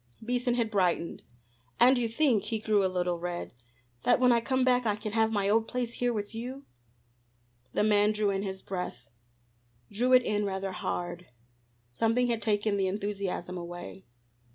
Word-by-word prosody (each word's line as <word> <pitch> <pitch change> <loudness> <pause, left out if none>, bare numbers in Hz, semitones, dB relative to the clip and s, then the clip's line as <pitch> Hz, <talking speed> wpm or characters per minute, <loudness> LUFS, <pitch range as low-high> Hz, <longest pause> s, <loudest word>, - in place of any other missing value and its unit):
Beason 245 0 0
had 230 -2 0
brightened. 180 -4 0 0.6
"And 255 +2 +7
you 245 -2 0
think," 230 -4 +2
he 220 +1 -1
grew 215 -2 +2
a 190 - +2
little 180 -1 -1
red 175 0 -5 0.5
"that 245 - +3
when 250 -1 +5
I 235 -1 +4
come 260 +2 +1
back 250 -2 +3
I 210 - +2
can 210 0 -5
have 220 0 +2
my 200 -2 +1
old 220 +2 +2
place 245 -2 -3
here 245 0 0
with 210 -1 -4
you?" 255 +5 -6 1.1
The - - +2
man 210 0 +4
drew 210 -1 +1
in 195 0 -1
his 190 -1 -5
breath, 180 -10 -5 0.8
drew 245 +5 +1
it 255 -1 +7
in 210 -2 0
rather 195 -1 -2
hard; 175 -1 -4 0.6
something 230 - +1
had 230 -2 0
taken 210 -1 +1
the 195 -1 +1
enthusiasm 195 -2 -3
away. 175 +2 -8
210 Hz, 175 wpm, -29 LUFS, 190-235 Hz, 1.1 s, And